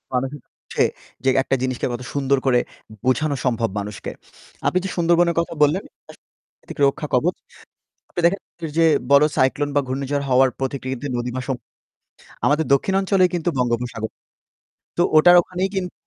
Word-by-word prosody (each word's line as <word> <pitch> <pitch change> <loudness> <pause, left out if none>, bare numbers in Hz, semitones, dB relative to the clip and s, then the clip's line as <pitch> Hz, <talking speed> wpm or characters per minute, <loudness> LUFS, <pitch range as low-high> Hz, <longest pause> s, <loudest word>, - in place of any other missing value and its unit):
মানুষের 135 +2 -2
হচ্ছে - - -3 0.6
একটা 135 - 0
জিনিসকে 130 -1 -1
কত 120 - -5
সুন্দর 140 -1 +1
করে 125 -2 +4 0.5
বোঝানো 140 +3 +1
সম্ভব 115 -2 +1
মানুষকে। 105 0 -6 0.6
আপনি 185 - +2
যে - - -2
সুন্দরবনের 170 0 +3
কথা 170 - -2
বললেন 160 +7 +2
এটা - - -63 0.2
আসলে - - -24 0.3
প্রাকৃতিক - - -11
রক্ষা 150 +2 -2
কবচ। 165 +9 +2 0.8
আপনি 175 - -3
দেখেন 195 +3 +1 0.4
যে 165 - +5 0.3
বড় 140 +1 +7
সাইক্লোন 135 +3 +2
বা - - +6
ঘূর্ণিঝড় 140 +2 -2
হওয়ার 130 +1 +5
প্রতিক্রিতে 130 0 -3
নদী 120 +1 -2
বা - - -1
সমূদ্র। 130 -3 -4 0.8
আমাদের 150 +2 +2
দক্ষিণ 190 +8 +2
অঞ্চলেই 190 -2 +3
কিন্তু 175 0 0
বঙ্গোপসাগর। 120 -2 -1 0.9
তো - - +5
ওটার 175 +3 +8
ওখানেই 185 +2 -3
কিন্তু 180 -2 -2
140 Hz, 155 wpm, -21 LUFS, 130-170 Hz, 0.9 s, ওটার